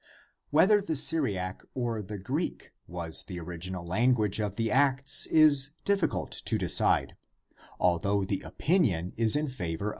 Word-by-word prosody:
Whether 195 +8 +4
the 175 -5 -4
Syriac 105 - +3
or 120 -4 -3
the 105 +1 -8
Greek 95 - -5 0.2
was 85 -2 -4
the 90 -3 -9
original 85 +1 -6
language 110 +2 +1
of 105 -2 -4
the 115 0 -2
Acts 135 0 +2
is 145 -3 +3
difficult 200 -2 -1
to - - 0
decide, - - +2 0.6
although 95 +3 0
the 95 0 -3
opinion 105 - -1
is 115 +1 +3
in 150 +1 -1
favor 95 - -5
of 80 - -7
the - - -6
latter. 105 - -1
110 Hz, 155 wpm, -27 LUFS, 90-140 Hz, 0.6 s, Whether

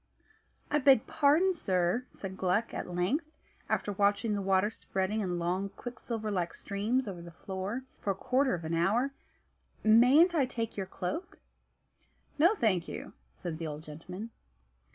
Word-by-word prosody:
"I 295 - +3
beg 270 -4 +5
pardon, 315 +6 +3
sir," 190 - 0
said 190 -1 -7
Gluck 190 +5 0
at - - -4
length, 190 - 0 0.4
after 205 - 0
watching 205 +2 +2
the 200 - -1
water 195 +2 +2
spreading 195 0 -2
in 180 -3 -1
long, 180 +3 -1
quicksilver 230 -1 -5
like 180 -4 -1
streams 220 +5 -1
over 180 -4 -5
the 170 - -9
floor 190 +7 -5 0.2
for - - -3
a 195 - +2
quarter 260 +6 +1
of 170 -2 -7
an 160 - -2
hour; 210 +11 +2 0.7
"mayn't 250 +11 +6
I 285 -6 +2
take 230 -3 -4
your 195 -2 -3
cloak?" 195 - -4 1.0
"No, 345 +8 +6
thank 190 - +1
you," - - -7 0.2
said 165 -3 -5
the 165 - -3
old 150 0 -6
gentleman. 180 +8 -8
205 Hz, 155 wpm, -31 LUFS, 180-250 Hz, 1.0 s, mayn't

